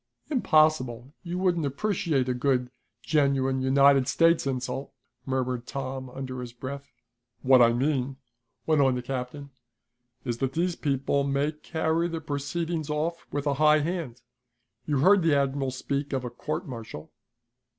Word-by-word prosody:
"Impossible; 155 - +2
you 175 0 -4
wouldn't 180 -3 +1
appreciate 150 -2 0
a 125 - +1
good, 125 0 0 0.3
genuine 135 -3 +1
United 135 0 +4
States 165 0 +3
insult," 130 +1 -3 0.4
murmured 130 -2 -2
Tom 130 -1 -5
under 130 0 -6
his 120 -1 -8
breath. 140 +3 -7 0.5
"What 130 -1 +6
I 115 -1 +6
mean," 135 +1 0 0.5
went 155 -2 +3
on 130 -2 +3
the 125 - -4
captain, 135 +2 -5 0.7
"is 120 -1 -2
that 135 0 -1
these 175 +1 0
people 140 -1 0
may 140 +2 0
carry 160 +2 -1
the 165 -1 -4
proceedings 160 +2 -3
off 160 +3 -2
with 145 0 -2
a 145 - +2
high 155 0 +6
hand. 150 -7 -4 0.6
You 145 -3 +1
heard 195 +5 +6
the 165 -3 +3
admiral 135 -1 0
speak 140 +2 -3
of 130 -2 -1
a 120 - -5
court 155 - -4
martial." 115 - -8
140 Hz, 150 wpm, -27 LUFS, 130-155 Hz, 0.7 s, What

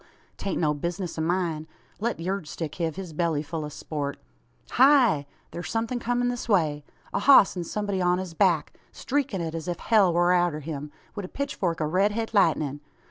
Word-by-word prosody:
'Tain't 195 - -3
no 150 -3 +2
bizness 170 +3 -4
o' - - 0
myen. 165 -2 -1 0.3
Let 230 -1 -1
yurd 185 0 -3
stick 155 0 -5
hev 160 -2 -1
his 185 -3 -7
belly 160 -2 0
ful 160 +1 -4
o' 150 - -5
sport. 145 -1 -4 0.5
Heigh! 245 - +5 0.2
thur's 175 - -6
somethin' 230 +2 -1
comin' 245 +1 0
this 245 -1 -4
way. 155 -7 +2 0.3
A - - +1
hoss 265 -9 +7
an 175 -2 -3
somebody 200 0 -2
on 180 0 +3
his 185 -2 -5
back 170 -3 +2 0.2
streakin' 270 -9 -2
it 165 -1 -3
as 165 0 -5
if 175 -1 -2
hell 205 -4 +4
war 175 +1 +3
arter 175 -4 +1
him, 150 -1 -6 0.2
wi' 205 - -3
a 185 - -6
pitchfork 185 - -2
o' - - +2
red 190 +6 +2
het 225 +1 -3
lightnin'! 155 -8 +2
175 Hz, 190 wpm, -26 LUFS, 160-205 Hz, 0.5 s, hoss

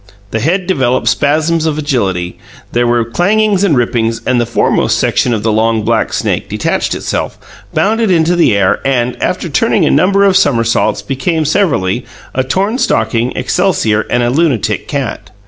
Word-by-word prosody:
The 110 - -1
head 175 - 0
developed 130 -8 0
spasms 155 +2 +1
of 155 -1 -1
agility; 100 - -2 0.3
there 120 0 +1
were 120 -1 +1
clangings 200 - +1
and 165 -9 +2
rippings, 115 -1 0
then 125 +1 0
the 120 - 0
foremost 120 - +1
section 125 - +1
of 110 -3 -1
the 110 - +1
long, 110 0 +1
black - - 0
snake - - -2
detached - - -1
itself, - - -3 0.3
bounded 220 +1 +1
into 170 -1 +2
the 130 -12 +3
air, 95 -2 +2
and, 125 -2 0
after - - -1
turning - - +1
a - - +2
number 195 +7 +3
of 195 -1 +3
somersaults, 120 -11 +1
became, 155 +4 -1
severally, 135 - 0 0.3
a 130 - 0
torn 195 - -1
stocking, 115 - 0
excelsior, 145 - +1
and 120 - +1
a 120 - +1
lunatic 125 -9 0
cat. 140 -4 -4
130 Hz, 165 wpm, -13 LUFS, 115-175 Hz, 0.3 s, the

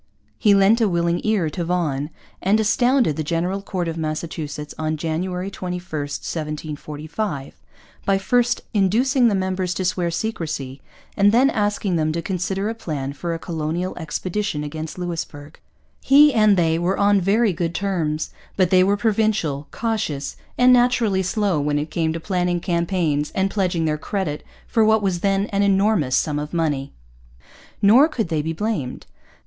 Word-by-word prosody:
He 205 -3 +5
lent 200 +4 +4
a 220 - +3
willing 170 -1 0
ear 215 -6 +1
to 175 - -3
Vaughan, 155 -5 -1 0.3
and 200 +4 +3
astounded 230 - +2
the 155 - -1
General 175 +5 -1
Court 185 -3 -3
of 165 0 -3
Massachusetts 155 -1 -4
on 155 0 -1
January 180 +4 -3
21, 180 -2 -4
1745, 150 +1 -5 0.5
by 195 -1 +2
first 245 +5 +1
inducing 240 +6 +3
the 210 - +2
members 185 -1 -1
to 185 - -2
swear 180 -1 0
secrecy 160 -8 -4 0.3
and 205 0 +4
then 255 +5 +4
asking 205 -3 0
them 155 -1 +1
to 170 - -2
consider 190 +2 -2
a 225 - -1
plan 145 -11 -4
for 165 +5 -3
a - - -3
colonial 165 +2 -3
expedition 175 +1 -3
against 155 +2 -6
Louisbourg. 165 -4 -6 0.4
He 290 +1 +6
and 215 -3 +4
they 165 -1 +2
were 180 +3 0
on 200 -1 +3
very 205 +3 +2
good 170 0 -2
terms. 165 -6 -1 0.3
But 185 -3 +2
they 185 -1 +6
were 200 +2 +2
provincial, 205 -9 0
cautious, 210 -12 -3 0.2
and 250 0 +6
naturally 240 -5 +3
slow 190 -3 0
when 145 0 0
it 150 +1 -3
came 160 0 0
to 165 - -4
planning 180 0 0
campaigns 170 -4 0
and 195 0 +1
pledging 180 -5 0
their 150 -1 0
credit 160 -5 -3 0.2
for 225 - +2
what 220 0 +3
was 185 -3 0
then 195 +1 +1
an 200 0 +1
enormous 195 -8 +2
sum 150 -2 0
of 150 +3 -5
money. 145 -5 -1 0.9
Nor 240 +9 +7
could 235 - -3
they 155 -2 0
be 160 +2 -3
blamed. 180 - -3
180 Hz, 165 wpm, -22 LUFS, 155-205 Hz, 0.9 s, Nor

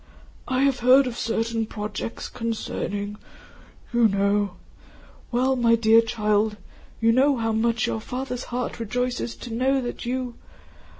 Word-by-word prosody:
"I 260 +1 +1
have 275 -2 +2
heard 255 +3 +6
of 250 -2 -4
certain 225 -1 -1
projects 210 +1 -5
concerning... 210 -3 -4 0.8
you 235 -1 +5
know. 200 -1 +1 0.8
Well 255 +2 +2
my 235 -2 +4
dear 225 0 +5
child, 215 -1 0 0.4
you 230 0 +4
know 270 +3 +4
how 225 -1 0
your 225 0 0
father's 250 +1 -4
heart 245 0 -4
rejoices 245 +1 -2
to 240 - -8
know 265 +3 +2
that 245 -2 -5
you... 250 0 -2
230 Hz, 130 wpm, -24 LUFS, 220-250 Hz, 0.8 s, heard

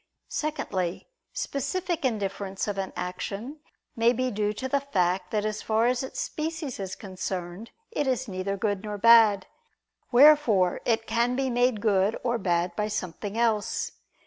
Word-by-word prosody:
Secondly, 190 - -2 0.2
specific 335 +5 -2
indifference 200 -5 -2
of 200 -1 -2
an 190 - -3
action 205 +10 -5 0.4
may 230 +1 +4
be 255 +1 -1
due 210 0 0
to 215 +5 -4
the 280 +2 +1
fact 185 -9 0
that 210 -1 -1
as 215 0 -2
far 220 +1 +1
as 245 0 +2
its 265 - -6
species 315 -5 -4
is 190 -1 -4
concerned, 185 +1 -5 0.2
it 295 -10 -1
is 260 0 0
neither 195 0 -3
good 205 -1 -1
nor 210 -1 -4
bad. 220 -3 +6 0.7
Wherefore 245 -9 +5
it 225 -1 +1
can 235 +2 +1
be 265 0 0
made 245 -3 +2
good 205 0 +2
or 240 -1 0
bad 175 -1 0
by 210 - -1
something 205 0 -4
else. 225 -1 0
220 Hz, 155 wpm, -27 LUFS, 195-255 Hz, 0.7 s, bad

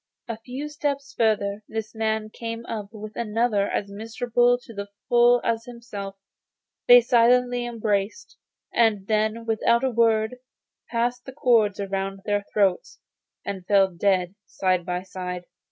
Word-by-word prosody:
A 230 -2 -5
few 255 +6 -6
steps 285 -2 -3
further 210 -2 +1
this 220 -1 -5
man 220 -1 -1
came 230 0 -6
up 215 -4 -5
with 215 -1 -9
another 225 -2 0
as 200 -1 -2
miserable 240 +3 +1
to 230 - -12
the 200 -1 -5 0.2
full 240 0 +5
as 230 0 -1
he 245 - -9
himself; 205 -5 -7 0.7
they 245 0 +9
silently 245 +1 +3
embraced, 215 - -2 0.4
and 220 -4 +2
then 220 +2 0
without 230 +2 +2
a 265 - +1
word 225 0 +2 0.5
passed 245 +1 -1
the 265 - -8
cords 230 -8 +3
round 195 0 -3
their 205 -1 0
throats, 205 - +1 0.5
and 195 -2 -4
fell 195 -2 +4
dead 180 0 +1
side 185 -2 0
by 180 0 -2
side. 180 -1 -6
220 Hz, 145 wpm, -24 LUFS, 200-240 Hz, 0.7 s, they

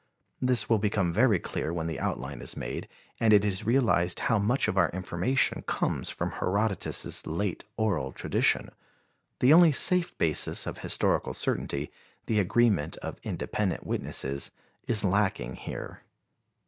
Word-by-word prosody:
This 125 -4 +2
will 115 -2 +3
become 100 -4 0
very 110 -1 +4
clear 80 - -4
when 85 -1 -3
the 80 -1 -4
outline - - -4
is - - -6
made - - -5 0.3
and 115 -1 +3
it 105 -1 +5
is 100 0 -2
realized 115 -8 +2
how 115 -3 +2
much 115 +4 +1
of 105 - -1
our 95 -3 +3
information 95 +8 0
comes - - -1
from - - -3
Herodotus' 100 +2 0
late 85 +4 -3
oral 95 - 0
tradition. - - 0 0.7
The 130 +4 +6
only 170 -1 +7
safe 180 +5 +2
basis 80 -2 +1
of - - -6
historical - - 0
certainty, 70 +1 -1 0.3
the 110 -2 +1
agreement 105 -4 +2
of - - -7
independent 100 -5 -3
witnesses, 70 +1 -1 0.4
is 110 -3 +1
lacking 95 - 0
here. - - -8
100 Hz, 145 wpm, -28 LUFS, 85-115 Hz, 0.7 s, only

